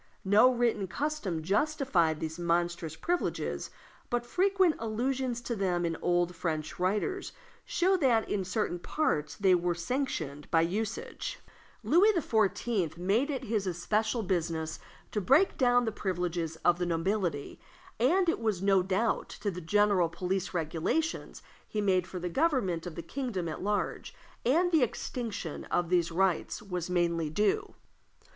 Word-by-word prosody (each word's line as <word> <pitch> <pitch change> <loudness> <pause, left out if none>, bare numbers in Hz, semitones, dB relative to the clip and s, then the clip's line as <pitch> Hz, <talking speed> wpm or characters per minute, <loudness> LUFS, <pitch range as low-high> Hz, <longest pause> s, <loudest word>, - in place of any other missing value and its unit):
No 210 +6 +6
written 235 -5 +1
custom 205 - -2
justified 200 - +1
these 160 +1 -4
monstrous 170 -2 0
privileges, 350 - -2 0.4
but 240 0 -1
frequent 375 +3 +3
allusions 245 +2 -1
to 235 0 -3
them 180 -4 0
in 165 - 0
the - - -7
old 175 0 +1
French 155 -2 -3
writers 210 - -1 0.3
show 370 +2 +2
that 245 -9 +2
in 195 - -1
certain 185 -1 -2
parts 160 - -1
they 190 0 +4
were 175 -1 +1
sanctioned 170 - -3
by 165 -1 +4
usage. 220 - -3 0.5
Louis 380 +7 +5
XIV. 210 - 0
made 205 - +1
it 270 -3 -2
his 215 -4 -1
especial 215 +6 0
business 165 -4 -2 0.3
to 210 - -1
break 275 - +4
down 245 -2 +3
the 220 - 0
privileges 175 -5 -2
of 175 0 +4
the 180 - 0
nobility, 170 -3 -1 0.4
and 350 +10 +3
it 335 - +1
was 215 -5 0
no 195 0 +4
doubt 195 +5 0
to 205 - 0
the 180 0 -7
general 200 0 +3
police 180 +2 -2
regulations 175 - -2 0.2
he 215 - -3
made 185 -3 +2
for 185 - -7
the 180 0 -3
government 195 - 0
of 165 - -7
the 170 - -6
kingdom 210 -4 -3
at 155 - -5
large 205 +1 -2 0.3
that 340 +8 +3
the 320 -4 +4
extinction 230 - -3
of 175 -2 0
these 175 -1 +2
rights 185 0 +1
was 180 -4 -4
mainly 170 -3 +1
due. 390 - 0
195 Hz, 150 wpm, -30 LUFS, 175-245 Hz, 0.5 s, No